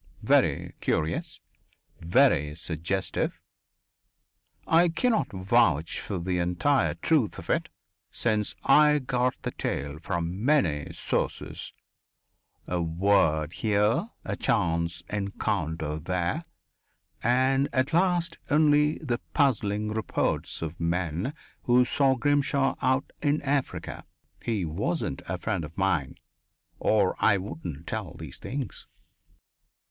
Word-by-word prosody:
Very - - +2
curious. 80 +1 -1 0.6
Very 85 - +3
suggestive. 85 +4 -2 1.3
I 170 +2 +4
cannot 225 +7 +1
vouch 95 -5 +2
for 100 - -4
the 90 +1 -1
entire 90 - +1
truth 120 - +1
of - - -4
it, - - 0 0.4
since 110 -3 0
I 150 0 +6
got 125 -2 0
the - - -2
tale 70 +2 -3
from 85 +4 -3
many 95 - +2
sources - - -3 0.9
a 90 -1 -1
word 80 -2 +2
here, 105 - +1 0.2
a - - -2
chance 85 -4 0
encounter 90 -6 -2
there, 90 - -2 0.8
and 130 +3 +2
at 130 +4 0
last 175 -1 +1
only 150 0 +4
the 125 -6 -2 0.2
puzzling 105 -7 +1
reports 110 -5 -1
of 80 +1 -5
men 85 - -1 0.3
who 125 0 +5
saw 135 +1 +3
Grimshaw 140 0 +1
out 130 +1 +1
in 145 0 +2
Africa. 140 -1 -2 0.4
He 105 -6 -1
wasn't 90 - -2
a - - -2
friend 85 - -2
of 80 +4 -9
mine, 90 -8 0 0.6
or - - +2
I 105 -3 +4
wouldn't 80 -4 -6
tell 105 -4 -4
these 80 -5 -9
things." 135 0 -5
100 Hz, 110 wpm, -27 LUFS, 85-135 Hz, 1.3 s, I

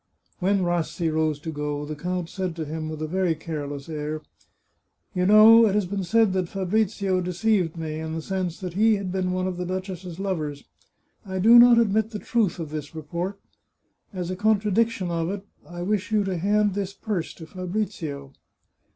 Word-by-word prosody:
When 195 0 +2
Rassi 175 -1 -1
rose 155 -1 +1
to 160 0 -4
go, 150 -1 -3
the 155 +1 -5
count 180 +2 -3
said 185 -2 -4
to 160 -2 -4
him, 155 +1 -4
with 155 0 -5
a - - -2
very 180 0 +1
careless 145 -3 -5
air: 155 -1 -4 0.4
" - - -48
You 180 -1 +1
know 220 +2 +8
it 200 - 0
has 210 -2 +2
been 195 +1 -3
said 220 +2 +3
that 185 -2 -1
Fabrizio 195 -1 0
deceived 180 -1 0
me, 155 -1 -4
in 160 0 -4
the 165 - -3
sense 185 -2 -3
that 180 -2 -5
he 215 +3 +4
had 195 -2 -4
been 185 -1 -1
one 185 0 -1
of 185 -1 -3
the 180 - -2
duchess's 185 -2 -5
lovers. 155 -7 -3 0.6
I 190 -3 -5
do 225 +6 +8
not 240 0 +8
admit 220 -1 +2
the 220 - -5
truth 210 -4 0
of 160 -3 -6
this 150 0 -6
report. 170 +5 -4 0.7
As 180 -3 -4
a - - -2
contradiction 210 -1 +1
of 165 0 -1
it, 200 0 -5 0.2
I 175 0 -6
wish 205 +2 -1
you 215 -1 +3
to 190 -2 -2
hand 205 +3 +2
this 195 0 -3
purse 195 -5 -3
to 160 - -10
Fabrizio." 175 -6 -4
185 Hz, 195 wpm, -25 LUFS, 160-200 Hz, 0.7 s, know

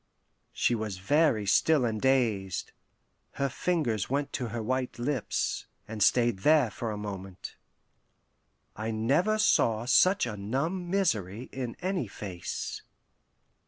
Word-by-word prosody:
'" - - -47
She - - +1
was 110 -4 -3
very 135 - +2
still 145 +6 +3
and 110 -2 -2
dazed; 115 -8 +1 0.6
her 140 0 -1
fingers 135 - -1
went 140 +2 -1
to 125 - -2
her 115 0 -4
white 130 +2 -2
lips, 125 0 -2 0.2
and 110 0 -6
stayed 120 -4 +3
there 150 -1 +4
for 115 +2 -4
a 105 - -4
moment. 95 -2 -7 1.2
I 110 +1 -4
never 140 - +1
saw 115 - +3
such 185 +9 +4
a 115 -3 -4
numb 145 - -2
misery 125 - -1
in 125 -3 -5
any 185 - -1
face. 95 -3 -6
120 Hz, 130 wpm, -29 LUFS, 105-145 Hz, 1.2 s, there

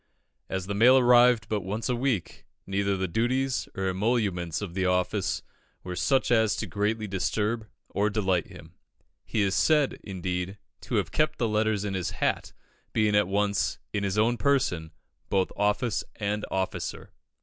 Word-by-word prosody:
As 95 -1 -2
the 100 - -3
mail 120 +6 +6
arrived 120 -2 +5
but 105 -2 -1
once 105 +5 -3
a 125 - +1
week, 120 -7 -2 0.2
neither 100 0 0
the 95 0 -1
duties 125 +8 0
nor 95 0 0
emoluments 95 -5 0
of 100 -5 -6
the 95 0 -1
office 90 0 0 0.4
were 90 0 -5
such 135 +7 +1
as 110 -3 +4
to - - -3
greatly 105 +1 -1
disturb 105 +3 -1 0.2
or 105 +1 0
delight 95 -5 0
him. - - -13 0.5
He 110 - 0
is 95 -1 +1
said, 150 +6 +3
indeed, 90 0 -3 0.3
to - - -2
have - - 0
kept 155 0 +1
the 115 - +1
letters 105 -1 +1
in 100 - -2
his 95 -2 -1
hat, - - 0 0.4
being 110 -2 +2
at 105 -2 +4
once, 100 +1 0 0.2
in 100 -1 -1
his 100 +1 -1
own 115 +3 +3
person, 120 - +1 0.4
both 95 -1 +1
office 105 +3 0
and 105 0 -2
officer. 95 0 -3
105 Hz, 165 wpm, -27 LUFS, 95-115 Hz, 0.5 s, mail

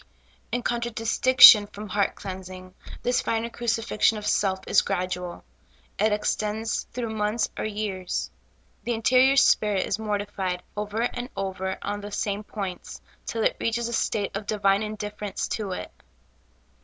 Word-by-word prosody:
In 245 - -1
contradistinction 235 -1 +6
from 210 0 -9
heart 200 +1 0
cleansing, 185 -1 -8 0.3
this 245 0 +1
finer 230 +1 -2
crucifixion 230 -2 +1
.of 210 - -7
self 190 -3 +1
is - - +5
gradual; 180 -1 -3 0.6
it 215 +1 +3
extends 215 +1 -1
through 235 -3 -4
months 210 +1 0
or - - -3
3^eais: 205 -4 -3 0.5
the 240 - -1
interior 255 +4 +4
spirit 210 -7 +4
is 205 - -2
mortified 205 -4 -3
over 210 +1 -3
and 245 +1 -3
over 190 -1 -3
on 205 0 -3
the 205 +1 -8
same 205 0 -2
points, 195 -4 -6 0.3
till 225 -1 -2
it - - +1
reaches 230 +1 -1
a - - -5
state 205 -3 -1
of 200 +1 -5
divine 200 -1 +2
indifference 210 -1 -4
to 210 -3 -3
it. - - -6
210 Hz, 145 wpm, -25 LUFS, 195-225 Hz, 0.6 s, contradistinction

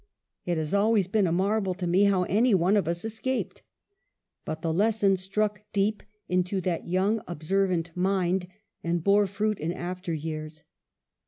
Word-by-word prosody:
It 175 -1 0
has 155 +1 -3
always 205 0 +3
been 195 +1 +1
a - - 0
marvel 195 +1 +1
to 180 -1 -4
me 180 +4 +4
how 195 -2 +3
any 220 +4 +3
one 185 +3 +3
of 200 -6 +1
us 170 +4 -2
escaped." 225 +4 -3 0.8
But 155 0 -5
the 165 -1 0
lesson 205 +1 +3
struck 205 +2 -1
deep 205 +2 +1 0.3
into 180 +2 0
that 175 -3 -2
young 195 +5 +1
observant 175 0 -1
mind, 185 0 +1 0.4
and 170 -1 -1
bore 200 +1 +4
fruit 210 +2 -1
in 160 +3 -2
after 180 +1 -5
years. 155 0 -5
190 Hz, 160 wpm, -27 LUFS, 175-205 Hz, 0.8 s, me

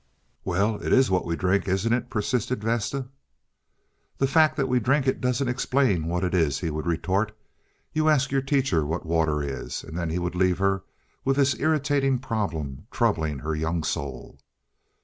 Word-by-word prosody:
"Well, 100 +4 +1
it - - -2
is 130 -5 +4
what 90 -1 +1
we 85 - 0
drink, 95 +2 +1
isn't 95 +5 +1
it?" 120 - -1
persisted 120 +1 -1
Vesta. 120 +4 -1 1.1
"The 135 - +2
fact 155 +2 +4
that 135 -2 +1
we 125 -1 +2
drink 135 +4 +2
it 130 - 0
doesn't 125 +1 0
explain 120 - +1
what 90 +2 -1
it 90 - -1
is," 80 -6 +2
he 85 -3 -2
would 75 +2 -4
retort. 95 +6 0 0.6
"You 155 0 +2
ask 140 -3 +2
your 135 0 +2
teacher 135 - +1
what 80 +4 -3
water 80 -2 +1
is"; 70 -3 -5
and 80 - -9
then 85 -1 -2
he 80 - -1
would 90 -1 -2
leave 90 0 +2
her 95 0 +1 0.4
with 135 0 +2
this 140 -2 +3
irritating 140 -3 +2
problem 100 - -3
troubling 85 - 0
her 80 +4 -3
young 80 +1 -1
soul. 70 -3 -4
100 Hz, 180 wpm, -25 LUFS, 85-130 Hz, 1.1 s, is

